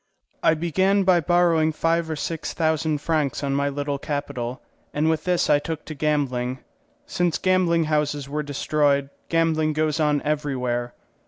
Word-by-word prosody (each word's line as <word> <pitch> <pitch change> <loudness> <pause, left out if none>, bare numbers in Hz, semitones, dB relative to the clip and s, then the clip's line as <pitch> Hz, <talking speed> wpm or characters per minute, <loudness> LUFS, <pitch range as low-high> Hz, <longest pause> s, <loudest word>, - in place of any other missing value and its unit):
I 160 - +4
began 190 +5 +2
by 185 -2 +4
borrowing 170 -1 +3
five 165 +1 0
or 160 - -2
six 160 +2 -4
thousand 160 -2 0
francs 150 -4 -1
on 140 -1 0
my 140 +1 +1
little 145 0 -3
capital, 135 -4 -4 0.4
and 155 +2 +2
with 160 -1 -2
this 180 -1 +1
I 145 -1 +4
took 160 +1 -5
to 155 - -6
gambling. 135 -4 -1 0.5
Since 175 - 0
gambling 180 -3 +2
houses 150 -2 -1
were 150 +2 -2
destroyed 145 -1 0 0.2
gambling 160 -2 +1
goes 155 +1 0
on 150 -1 +2
everywhere. 125 -5 -2
155 Hz, 155 wpm, -23 LUFS, 145-165 Hz, 0.5 s, I